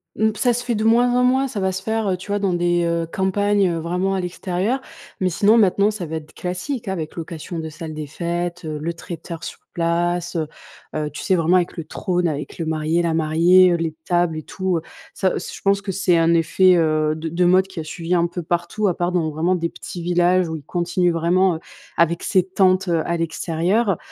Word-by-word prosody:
Mmh, 220 0 +2
ça 245 +1 +2
se 245 - -3
fait 245 -1 -1
de 215 - -1
moins 235 +2 +4
en - - +3
moins, 260 +2 +3
ça 215 -5 -4
va 190 0 +1
se 190 0 -4
faire, 220 0 -1
heu, 185 -1 +1
tu 185 - -11
vois, 205 - +1
dans 195 -3 0
des, 175 0 +1
heu, 170 0 0
campagnes, 200 +1 +2
heu, 165 - -2
vraiment 180 +4 -1
à 190 - 0
l'extérieur, 185 +6 -2 0.4
mais 185 - +1
sinon 205 +6 +4
maintenant, 200 -1 +4
ça 210 -4 -4
va 160 0 -4
être 155 -1 -11
classique 185 +7 -4
avec 165 -5 -4
location 165 0 -6
de 160 -1 -4
salle 155 0 -7
des 155 0 -4
fêtes, 175 +3 -3
heu, 155 -1 -4
le 165 +3 -3
traiteur 165 0 -8
sur - - -7
place, 175 +1 0
heu 160 -2 -1 0.5
heu, 150 -1 -1
tu 150 - -8
sais, 190 - +2
vraiment 170 0 +3
avec 180 -1 +1
le 165 - -3
trône 180 +2 -1
avec 150 +1 -5
le 165 - -2
marié, 160 +2 0
la 165 -2 0
mariée, 170 +4 +5
heu, - - +3
les 165 -2 -3
tables 175 -2 +1
et 155 - -5
tout, 190 -2 -2
heu, 160 - -3 0.3
ça 190 -2 0
c - - -7
je - - -12
pense 200 0 +3
que 195 - -3
c'est 185 -2 +2
un 165 0 +3
effet, 180 +3 +4
heu, 155 -2 +2
de 160 +1 -4
de 175 +3 +1
mode 185 +2 +5
qui 190 -3 -8
a - - -3
suivi 165 +2 -4
un 170 -1 +3
peu 175 0 -6
partout, 175 +5 -1
à 180 - +1
part 175 0 -1
dans 165 -3 0
vraiment 170 +5 +1
des 170 -1 -1
petits 175 0 -8
villages 175 +1 +3
où 160 - -4
ils - - -10
continuent 175 +2 0
vraiment, 175 +2 +2
heu, 160 - -6 0.4
avec 170 0 +2
ces 185 -2 +2
tentes, 185 0 +2
heu, 165 -2 +2
à 170 - 0
l'extérieur. 170 +6 0
175 Hz, 240 wpm, -21 LUFS, 165-190 Hz, 0.5 s, mariée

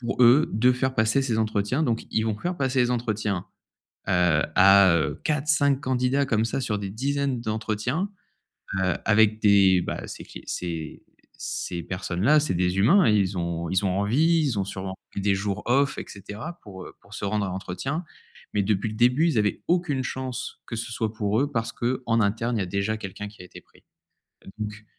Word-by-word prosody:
pour 120 +1 -3
eux, 125 +6 +6
de 125 +4 +4
faire 130 +1 -1
passer 110 +5 +3
ces 115 -4 -1
entretiens. 110 +6 0
Donc 115 -4 -1
ils 110 - +1
vont 110 -2 -1
faire 175 +9 -3
passer 130 -1 0
les 125 0 +2
entretiens, 110 -6 -2 0.6
heu, 90 -4 +3
à, 95 -2 +7
heu, 80 - -1
4-5 145 -2 +2
candidats 130 +1 +1
comme 110 -4 +1
ça 115 - -2
sur 105 -4 -1
des 100 -1 -4
dizaines 135 +3 -1
d'entretiens, 110 - -2 0.7
heu, 95 -1 +1
avec 110 0 +4
des 100 -3 +5
bah, - - -5
ces - - -8
q - - -11
ces 80 -3 -5 0.3
ces 85 -1 -4
personnes-là. 95 - +1
C'est 145 - -1
des 90 +1 0
humains 160 - +5
et 110 - +4
ils 95 -2 0
ont 85 -1 -3
ils 95 +2 +1
ont 95 - +1
envie, 155 +12 +3
ils 115 -7 -1
ont 95 - 0
sûrement 95 -1 -5 0.2
pris - - -5
des 100 0 +2
jours 100 +1 -3
off 135 +3 +2
et - - -4
cetera, 105 - -8
pour, 95 -4 -10
heu, - - -12
pour 100 - -22
se - - -5
rendre 105 +1 0
à - - -4
l'entretien. 95 - -4 0.5
Mais 105 - +2
depuis 100 +1 0
le 110 - -6
début 125 +8 +3
ils 145 - 0
avaient 105 -1 0
aucune 170 -6 +1
chance 130 -1 -5
que 115 - -5
ce 115 +2 -4
soit 110 -2 -2
pour 110 0 0
eux 145 - -2
parce 115 -1 -2
qu'en 120 -1 0
interne, 115 +4 0
il - - 0
y - - +1
a - - -3
déjà 100 +4 -1
quelqu'un 100 0 -7
qui 105 - -13
a - - -11
été 90 - -12
pris. - - -26 0.7
Donc 105 0 -6
110 Hz, 205 wpm, -25 LUFS, 100-130 Hz, 0.7 s, à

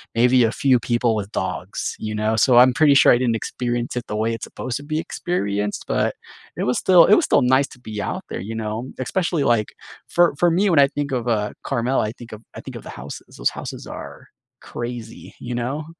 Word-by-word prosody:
maybe 125 +1 +4
a 115 - +2
few 130 -2 +2
people 120 -1 +1
with 105 0 -4
dogs, 95 0 -3
you 110 0 -4
know, 110 +1 0
so 120 +3 +4
I'm 125 +1 +8
pretty 150 -1 +5
sure - - +7
I - - +4
didn't 120 -3 +1
experience 120 +1 -3
it 120 - -3
the 105 - -4
way 110 +2 0
it's 115 - -5
supposed 130 -1 -5
to 145 - -9
be 155 +1 -3
experienced, 105 - -3
but - - 0 0.4
it - - -1
was 125 0 +1
still 180 -3 +6
it 205 - +5
was 335 - +2
still - - +3
nice 130 +2 +3
to 125 - -15
be 110 -4 -6
out - - -4
there, - - -4
you 110 +3 -6
know, 110 +3 -4
especially 165 +2 -1
like 115 -3 +2 0.4
for 175 -4 +3
for 175 - +3
me, 195 +4 +2
when 150 - +4
I 140 - +7
think 145 0 -4
of, 125 -2 -2
uh, 105 -3 0
Carmel, 120 +3 0
I 110 - -1
think 120 -1 -13
of 110 0 -9
I - - -7
think - - -9
of - - -7
the - - -10
houses, 70 +4 -10
those - - +1
houses - - -7
are - - -9 0.3
crazy, 120 -1 -7
you 120 0 -5
know? 135 +6 -3
120 Hz, 235 wpm, -21 LUFS, 110-135 Hz, 0.4 s, I'm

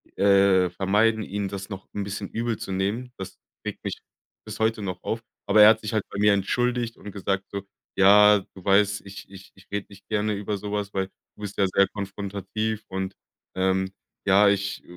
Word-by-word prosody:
äh, 95 -2 +4
vermeiden, 105 +5 +2
ihn 100 -1 -3
das 100 +1 -6
noch 95 -2 -8
'n 100 - -2
bisschen 100 0 -5
übel 115 -1 -2
zu - - -6
nehmen. 100 +7 -2
Das 95 - -8 0.3
regt - - -6
mich - - -4 0.5
bis 110 0 -8
heute 110 0 +1
noch 95 -2 -5
auf. 115 - -2 0.2
Aber 105 +1 +5
er 105 - +10
hat 110 0 +3
sich 110 - -4
halt 110 -2 +1
bei - - -7
mir 105 0 +5
entschuldigt 120 +4 0
und 105 - -9
gesagt 95 -1 -2
so: 100 - -3 0.3
„Ja, 105 +2 +7 0.2
du 95 - -13
weißt, 100 +1 +3
ich 100 0 -10
ich 95 0 -13
ich 95 - -20
rede 100 0 -2
nicht 100 -1 -16
gerne 105 0 0
über 100 0 -3
so 100 +1 -6
was, 105 -1 -2
weil 95 -1 0 0.3
du - - -16
bist 100 -1 -6
ja 100 - +3
schwer 100 +1 +4
konfrontativ 100 +2 -4
und, 95 0 -4 0.4
ähm, 95 0 +1 0.3
ja, 100 +1 +6
ich 100 0 -1
100 Hz, 200 wpm, -25 LUFS, 95-105 Hz, 0.5 s, er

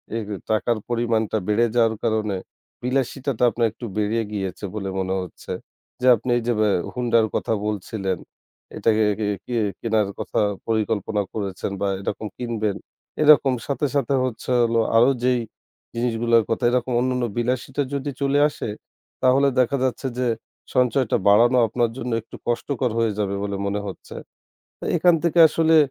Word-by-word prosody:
এই 115 - -1 0.3
টাকার 110 +2 +1
পরিমাণটা 115 -2 0
বেড়ে 105 +3 +3
যাওয়ার 115 -2 +3
কারণে 110 -3 0 0.5
বিলাসিতাটা 135 0 -1
তো 120 - +6
আপনার 115 0 +1
একটু 120 - -9
বেড়ে 105 +2 +1
গিয়েছে 95 -1 -4
বলে 100 -2 -3
মনে 95 0 -1
হচ্ছে 90 -3 -9 0.5
যে 130 - +2
আপনি 115 +3 -6
এই - - -1
যে - - +3 0.4
হুন্ডার 115 -2 +2
কথা - - 0
বলছিলেন। 95 -2 -2 0.6
এটাকে 110 -1 +2 0.4
কে 120 - -4 0.3
কেনার 110 -3 +1
কথা - - -2 0.3
পরিকল্পনা 110 -1 0
করেছেন 100 -2 -3
বা 100 - +1
এরকম 105 +2 -4
কিনবেন। 110 -4 -2 0.5
এরকম 145 -3 +6
সাথে, 140 0 -1
সাথে 140 -1 +1
হচ্ছে 125 0 -3
হলো 115 0 +2 0.2
আরো 120 +3 +6
যেই 125 -1 +3 0.6
জিনিসগুলোর 115 -1 +2
কথা 115 +2 -1
এরকম 125 0 0
অন্যান্য 125 0 0
বিলাসিটা 130 +3 -1
যদি 140 +1 -2
চলে 140 +1 +2
আসে 145 - -6 0.5
তাহলে 135 +2 +5
দেখা 130 +2 +2
যাচ্ছে 130 +1 -1
যে 125 - +1 0.5
সঞ্চয়টা 125 -1 +2
বাড়ানো 120 +5 +6
আপনার 120 +1 0
জন্য 125 -1 -4
একটু 110 - -13
কষ্টকর 125 +1 -1
হয়ে 115 -2 +2
যাবে 100 -1 -1
বলে 100 -1 -3
মনে 100 +1 -1
হচ্ছে। 95 - -9 0.8
এখান 175 +1 +5
থেকে 170 0 +2
আসলে 160 0 +3
115 Hz, 150 wpm, -23 LUFS, 110-125 Hz, 0.8 s, তো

